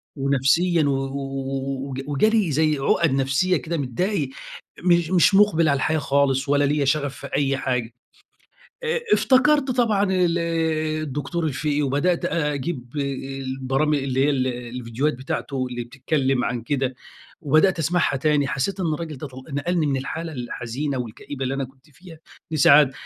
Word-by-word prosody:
ونفسيًا 140 Hz, +5 st, +2 dB
و 145 Hz, -, +2 dB
و 135 Hz, 0 st, -3 dB
وج 135 Hz, 0 st, -4 dB
وجالي 195 Hz, +6 st, +2 dB
زي 155 Hz, +1 st, +2 dB
عُقَد 155 Hz, +3 st, +2 dB
نفسيّة 140 Hz, +7 st, +2 dB
كده، 155 Hz, +5 st, -4 dB
متضايق، 145 Hz, -, -1 dB, 0.5 s
مش 170 Hz, -2 st, +3 dB
مش 185 Hz, +2 st, +5 dB
مُقبِل 180 Hz, -6 st, +4 dB
على 140 Hz, -, +2 dB
الحياة 155 Hz, +3 st, +1 dB
خالص 140 Hz, -1 st, +1 dB
ولا 145 Hz, 0 st, +3 dB
ليَّ 145 Hz, 0 st, +1 dB
شغف 140 Hz, 0 st, 0 dB
في -, -, -8 dB
أي 135 Hz, -1 st, +1 dB
حاجة. 125 Hz, -3 st, -2 dB, 0.9 s
آآ 475 Hz, 0 st, 0 dB
افتكرْت 275 Hz, +1 st, +4 dB
طبعًا 230 Hz, -5 st, +2 dB
ال 175 Hz, -2 st, +2 dB, 0.6 s
الدكتور 155 Hz, +4 st, -3 dB
الفقي 150 Hz, 0 st, -1 dB
وبدأت 145 Hz, +6 st, +1 dB
أجيب 145 Hz, -4 st, -2 dB
آآ -, -, +1 dB, 0.4 s
البرام 135 Hz, +3 st, 0 dB
اللي 135 Hz, -2 st, 0 dB
هي 145 Hz, -, +3 dB
ال 130 Hz, -3 st, 0 dB
الفيديوهات 125 Hz, +2 st, -2 dB
بتاعته 130 Hz, +1 st, -3 dB
اللي 120 Hz, -1 st, -4 dB
بتتكلم 135 Hz, 0 st, -1 dB
عن 120 Hz, -1 st, -2 dB
كده 135 Hz, +1 st, -1 dB, 0.5 s
وبدأت 155 Hz, +4 st, +3 dB
أسمعها 165 Hz, -2 st, +1 dB
تاني، 145 Hz, +1 st, +2 dB
حسّيت 185 Hz, +9 st, -2 dB
إن 165 Hz, -4 st, 0 dB
الرجل 160 Hz, -1 st, -6 dB
ده 150 Hz, -, -6 dB
طل 130 Hz, -1 st, -11 dB
نقَلني 155 Hz, +3 st, 0 dB
من 140 Hz, -2 st, 0 dB
الحالة 160 Hz, +5 st, -4 dB
الحزينة 130 Hz, +2 st, -4 dB
والكئيبة 125 Hz, +3 st, -6 dB
اللي 130 Hz, +1 st, -1 dB
أنا 135 Hz, 0 st, -2 dB
كنت 135 Hz, +3 st, -17 dB
فيها 165 Hz, +3 st, -14 dB, 0.3 s
لسعادة، 145 Hz, -2 st, +6 dB
140 Hz, 155 wpm, -23 LUFS, 135-165 Hz, 0.9 s, لسعادة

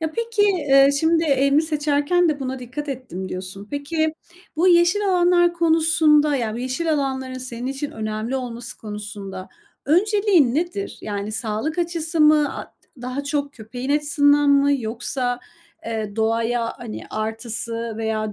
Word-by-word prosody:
Ya, 320 Hz, -1 st, -2 dB
peki, 465 Hz, -1 st, 0 dB
eee, 290 Hz, -9 st, +5 dB
şimdi 325 Hz, +1 st, +3 dB
"Evimi 280 Hz, 0 st, +3 dB
seçerken 305 Hz, +2 st, +1 dB
de 295 Hz, -2 st, -1 dB
buna 265 Hz, 0 st, -3 dB
dikkat 255 Hz, +4 st, -6 dB
ettim." 240 Hz, -9 st, -5 dB
diyorsun. 190 Hz, +2 st, -7 dB
Peki, 310 Hz, +2 st, -1 dB, 0.4 s
bu 355 Hz, +4 st, +4 dB
yeşil 360 Hz, +4 st, +4 dB
alanlar 350 Hz, -1 st, +4 dB
konusunda 315 Hz, -3 st, +3 dB
yani, 225 Hz, -4 st, -2 dB
bu -, -, -4 dB
yeşil 260 Hz, +6 st, -1 dB
alanların 265 Hz, -3 st, -2 dB
senin 250 Hz, -1 st, -6 dB
için 275 Hz, +2 st, -3 dB
önemli 215 Hz, +3 st, -3 dB
olması 245 Hz, -1 st, -6 dB
konusunda 205 Hz, -3 st, -7 dB, 0.4 s
önceliğin 370 Hz, -, +3 dB
nedir? 350 Hz, +6 st, -2 dB
Yani, 205 Hz, 0 st, -4 dB
sağlık 220 Hz, +9 st, -3 dB
açısı 330 Hz, -2 st, -1 dB
mı, 300 Hz, -1 st, +4 dB
a -, -, -5 dB
d -, -, -23 dB, 0.3 s
daha 255 Hz, +3 st, -4 dB
çok 285 Hz, 0 st, -2 dB
köpeğin 245 Hz, +2 st, -6 dB
açısından 290 Hz, 0 st, +3 dB
mı? 280 Hz, 0 st, +4 dB
Yoksa, 245 Hz, +2 st, -3 dB, 0.5 s
eee, 220 Hz, -2 st, -4 dB
doğaya, 230 Hz, +1 st, 0 dB
hani, 235 Hz, -3 st, -7 dB
artısı 225 Hz, +1 st, -4 dB
veya 220 Hz, -1 st, -2 dB
275 Hz, 145 wpm, -22 LUFS, 230-315 Hz, 0.5 s, eee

